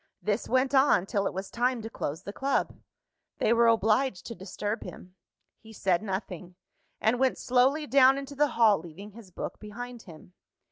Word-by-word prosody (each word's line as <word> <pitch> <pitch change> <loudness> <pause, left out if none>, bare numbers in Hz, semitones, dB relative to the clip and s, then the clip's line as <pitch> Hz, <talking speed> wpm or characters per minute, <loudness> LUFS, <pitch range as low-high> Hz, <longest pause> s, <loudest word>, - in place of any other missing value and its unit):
This 210 +2 -2
went 260 +2 +2
on 265 -9 +4
till 200 0 -1
it - - -3
was 190 +1 -5
time 245 -1 0
to - - -5
close 160 -2 -5
the 200 - -7
Club. 275 +4 -1 0.6
They 225 - +2
were 235 0 +4
obliged 225 -1 +2
to 230 - -6
disturb 205 +2 -5
him. 180 - -11 0.5
He 220 0 -15
said 185 -4 +1
nothing; 190 -3 -6 0.4
and 235 +3 +1
went 265 -1 +2
slowly 260 +5 +2
down 270 0 +5
into 275 0 -7
the 295 +1 +2
hall, 220 -4 +5
leaving 185 +5 -11
his 215 -2 -14
book 175 - -7
behind 240 +3 -8
him. 175 -2 -15
225 Hz, 180 wpm, -28 LUFS, 195-255 Hz, 0.6 s, down